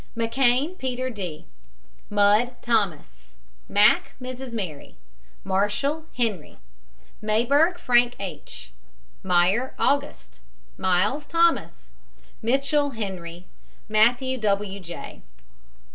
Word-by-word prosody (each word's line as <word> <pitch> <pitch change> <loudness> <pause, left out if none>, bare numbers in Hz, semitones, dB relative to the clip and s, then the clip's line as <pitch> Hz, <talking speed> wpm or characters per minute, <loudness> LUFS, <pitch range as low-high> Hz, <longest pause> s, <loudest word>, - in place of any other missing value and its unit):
McKANE, 255 +8 +1
PETER 255 0 -3
D. 180 -8 -6 0.6
MUDD, 210 +4 +3
THOMAS. 155 - -2 0.3
MACK, 205 +1 +4
MRS. 255 0 -7
MARY. 180 -11 -6 0.5
MARSHALL, 205 +11 0
HENRY. 215 -10 -2 0.6
MAYBERG, 270 +11 +2
FRANK 245 -6 +3
H. 150 - -8 0.5
MEYER, 190 +8 +2
AUGUST. 285 +1 -1 0.4
MYLES, 205 +11 +1
THOMAS. 335 0 +1 0.5
MITCHELL, 275 +5 +1
HENRY. 180 -5 -6 0.4
MATTHEWS, 240 +4 +2
W. 200 -2 -1
J. 175 -2 -9
225 Hz, 85 wpm, -24 LUFS, 190-260 Hz, 0.6 s, MACK